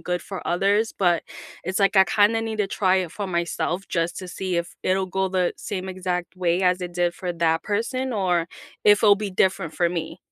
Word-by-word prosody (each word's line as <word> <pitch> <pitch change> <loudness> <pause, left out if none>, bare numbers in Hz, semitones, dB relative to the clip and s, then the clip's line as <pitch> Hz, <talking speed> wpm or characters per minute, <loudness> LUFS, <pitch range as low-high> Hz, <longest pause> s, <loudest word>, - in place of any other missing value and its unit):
good 180 -1 -2
for 195 0 -7
others, 200 +5 +1
but 175 -3 +3 0.4
it's 185 +3 -2
like 195 0 +3
I 190 - +8
kinda 210 +3 +3
need 220 -1 -4
to 205 - +1
try 190 -2 +2
it 180 -2 -2
for 200 -2 -4
myself 175 +2 -2
just 170 0 -1
to 185 - -7
see 180 0 -3
if 170 0 -3
it'll 190 0 +1
go 190 +1 -1
the 185 -1 0
same 190 -2 -5
exact 180 -1 -3
way 180 0 0
as 180 0 +2
it 175 -1 -6
did 175 -1 +1
for 180 -1 -4
that 165 -1 +1
person 250 +5 -2
or 180 -5 +1 0.3
if 210 +1 +5
it'll 205 - +8
be 205 -1 -4
different 185 -3 +1
for 175 -1 +1
me. 170 0 -4
185 Hz, 215 wpm, -24 LUFS, 175-200 Hz, 0.4 s, I